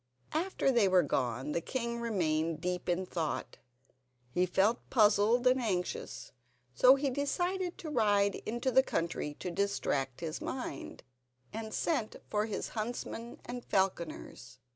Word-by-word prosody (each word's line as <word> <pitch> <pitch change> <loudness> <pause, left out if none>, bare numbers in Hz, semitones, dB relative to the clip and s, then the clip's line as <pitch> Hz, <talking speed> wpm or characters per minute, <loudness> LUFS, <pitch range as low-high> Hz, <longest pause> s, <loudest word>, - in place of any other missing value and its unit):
After 325 -4 +1
they 235 -6 +4
were 185 -1 +5
gone 130 +2 -1
the 170 - 0
king 235 +3 -3
remained 165 -7 0
deep 180 +1 -2
in 180 +2 +1
thought. 165 -4 -3 0.7
He 180 +7 +2
felt 205 +6 +3
puzzled 220 +1 +4
and 255 +1 +4
anxious; 185 -6 -3 0.4
so 255 - +7
he 275 0 0
decided 350 +7 -1
to 325 - -6
ride 205 -5 +3
into 240 +4 0
the 265 - +7
country 165 - -2
to 180 - -5
distract 155 -9 -1
his 160 -1 -4
mind, 250 - -5 0.5
and 220 0 -5
sent 245 -7 -1 0.2
for 210 +1 +1
his 215 - -3
huntsmen 230 +1 -5
and 245 0 -6
falconers. 170 - -2
210 Hz, 140 wpm, -32 LUFS, 170-245 Hz, 0.7 s, so